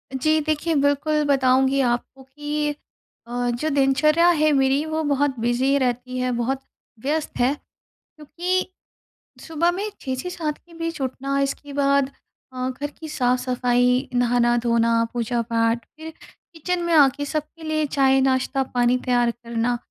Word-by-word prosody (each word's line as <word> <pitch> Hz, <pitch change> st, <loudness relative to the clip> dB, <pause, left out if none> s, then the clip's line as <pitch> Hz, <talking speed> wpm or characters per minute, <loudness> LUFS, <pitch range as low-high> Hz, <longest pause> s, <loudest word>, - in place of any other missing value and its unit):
जी 310 Hz, +4 st, +2 dB
देखिए, 310 Hz, +2 st, -1 dB
बिल्कुल 285 Hz, +2 st, +1 dB
बताऊँगी 265 Hz, -1 st, +3 dB
आपको 245 Hz, +2 st, -2 dB
कि 295 Hz, +2 st, -3 dB, 0.5 s
अ, 245 Hz, +1 st, -2 dB
जो 240 Hz, +6 st, -1 dB
दिनचर्या 290 Hz, +4 st, +3 dB
है 310 Hz, -3 st, +3 dB
मेरी 270 Hz, +1 st, +2 dB
वो 315 Hz, 0 st, -2 dB
बहुत 285 Hz, -1 st, +1 dB
बिज़ी 245 Hz, +4 st, +1 dB
रहती 255 Hz, -1 st, -2 dB
है, 255 Hz, 0 st, 0 dB
बहुत 260 Hz, +3 st, -1 dB, 0.4 s
व्यस्त 300 Hz, +6 st, -2 dB
है। 250 Hz, +3 st, +3 dB, 0.4 s
क्योंकि 350 Hz, +5 st, -3 dB, 0.7 s
सुबह 325 Hz, +2 st, 0 dB
में 400 Hz, +4 st, -3 dB
6 260 Hz, -1 st, -3 dB
से 310 Hz, +8 st, -5 dB
7 315 Hz, -4 st, -3 dB
के 345 Hz, -, -22 dB
बीच 330 Hz, -1 st, -4 dB
उठना। 275 Hz, +1 st, -2 dB
इसके 280 Hz, +1 st, -3 dB
बाद 280 Hz, -1 st, +2 dB, 0.4 s
अ, 255 Hz, 0 st, -2 dB
घर 275 Hz, +3 st, -4 dB
की 320 Hz, -, -7 dB
साफ-सफाई, 250 Hz, -1 st, +1 dB
नहाना-धोना, 235 Hz, -1 st, +2 dB
पूजा-पाठ 230 Hz, -1 st, 0 dB
फिर 320 Hz, +1 st, -8 dB, 0.4 s
किचन 350 Hz, +2 st, -2 dB
में 340 Hz, 0 st, 0 dB
आके 285 Hz, -2 st, +4 dB
सबके 305 Hz, +3 st, -5 dB
लिए 310 Hz, -1 st, 0 dB
चाय-नाश्ता 270 Hz, -1 st, +2 dB
पानी 245 Hz, 0 st, +3 dB
तैयार 245 Hz, -1 st, +2 dB
करना। 235 Hz, 0 st, -2 dB
270 Hz, 140 wpm, -23 LUFS, 245-305 Hz, 0.7 s, आके